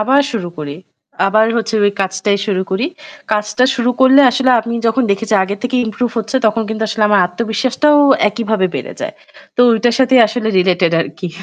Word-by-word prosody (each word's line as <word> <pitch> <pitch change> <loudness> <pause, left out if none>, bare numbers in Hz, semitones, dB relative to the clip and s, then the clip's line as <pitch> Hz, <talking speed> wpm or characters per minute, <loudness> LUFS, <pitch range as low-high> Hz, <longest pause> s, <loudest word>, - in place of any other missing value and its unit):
আবার 265 +6 +3
শুরু 185 -6 -4
করি। 145 -2 -6 0.5
আবার 215 +2 +3
হচ্ছে 225 -1 -2
ওই 205 - +3
কাজটাই 190 +1 -1
শুরু 190 -3 -1
করি। 210 +9 -1 0.5
কাজটা 210 +3 0
শুরু 245 +1 0
করলে 265 +2 +6
আসলে 260 +1 +1
আমি 235 +1 -5
যখন 230 +4 +1
দেখেছি 210 +2 -1
আগের 200 +2 -4
থেকে 250 +1 -2
improve 225 +2 -3
হচ্ছে 220 +4 -3
তখন 220 +1 0
কিন্তু 220 0 -4
আসলে 220 0 -2
আমার 205 -2 +3
আত্মবিশ্বাসটাও 250 +9 0 0.3
একইভাবে 210 -2 -1
বেড়ে - - -5
যায়। - - -5 0.4
তো - - +1
ওইটার 230 +1 +1
সাথেই 260 -1 +4
আসলে 220 0 -3
related 180 -2 +1
আরকি 165 +2 -6
220 Hz, 180 wpm, -15 LUFS, 200-245 Hz, 0.5 s, করলে